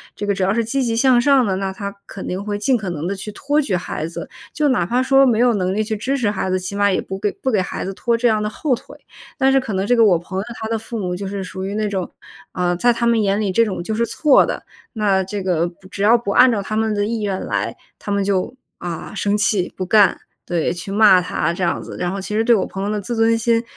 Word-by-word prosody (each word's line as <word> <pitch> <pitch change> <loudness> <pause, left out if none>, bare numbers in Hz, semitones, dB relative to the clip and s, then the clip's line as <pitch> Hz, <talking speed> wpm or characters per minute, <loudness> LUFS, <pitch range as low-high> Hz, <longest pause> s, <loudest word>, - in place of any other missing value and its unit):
这 205 - -4
个 200 - +2
只 195 - -2
要 195 - +2
是 230 +1 +1
积 260 +4 -1
极 230 -2 -1
向 245 0 +4
上 275 -2 +4
的， 190 -2 0
那 195 0 -2
他 200 +1 -6
肯 195 - -8
定 185 +2 -3
会 205 -1 -3
尽 255 +5 +2
可 205 -5 -5
能 170 0 -4
地 200 - -2
去 205 +2 -7
托 290 +7 0
举 210 -9 -3
孩 170 -2 -3
子， 170 - -7 0.2
就 300 -1 +1
哪 245 -9 +2
怕 245 +6 +1
说 270 +1 +5
没 235 -4 +2
有 245 0 +4
能 185 -2 0
力 215 - 0
去 220 0 -3
支 260 +7 -1
持 230 -6 +1
孩 190 -2 -2
子， 185 0 +1
起 185 +2 -6
码 205 0 +3
也 185 - +1
不 190 - -6
给 205 +1 -1
不 260 - -4
给 205 -5 +2
孩 180 - -4
子 195 - -4
拖 235 +4 0
这 240 +1 +2
样 215 -2 +2
的 210 - -1
后 270 +3 -1
腿。 - - -14 0.4
但 265 -2 +3
是 270 - +4
可 255 -4 -5
能 190 +1 0
这 245 - +4
个 230 - +5
我 180 -4 +5
朋 185 +2 -7
友， 195 - -2 0.2
他 220 - -4
的 225 - 0
父 225 +1 -7
母 180 -2 -2
就 200 +2 -5
是 200 0 -4
属 190 +1 -6
于 200 +1 -4
那 215 0 0
种， 190 -3 -3 0.4
啊， 175 -1 0
在 240 +7 +3
他 235 0 -1
们 230 -2 +3
眼 200 0 +1
里， 205 -3 0
这 230 - +4
种 195 -5 -3
就 220 - -3
是 235 +1 +1
错 295 +3 +4
的， - - -5 0.3
那 200 -4 +1
这 200 +2 -5
个 170 -3 +1
不 185 +2 -18
只 200 +1 -4
要 225 +3 +6
不 215 -4 -3
按 250 +3 +6
照 210 -3 0
他 215 +2 -4
们 220 0 +1
的 205 0 0
意 225 0 -2
愿 195 -2 -2
来， - - -2 0.2
他 205 - -5
们 200 0 +1
就 195 +3 0 0.3
啊， 170 -2 -6
生 205 +1 0
气、 200 -3 +1
不 185 - -3
干， 205 -1 +4 0.3
对， 170 -2 0
去 180 +3 -7
骂 205 -3 +6
他 170 -2 -1
这 180 - -4
样 170 - 0
子， - - -9
然 180 0 -1
后 195 0 -4
其 210 +2 -4
实 220 - +2
对 235 0 +5
我 190 - 0
朋 195 0 -5
友 205 - -1
的 210 -1 -2
自 235 +4 -4
尊 225 0 +3
心， 230 0 +1
205 Hz, 315 characters per minute, -20 LUFS, 190-230 Hz, 0.4 s, 要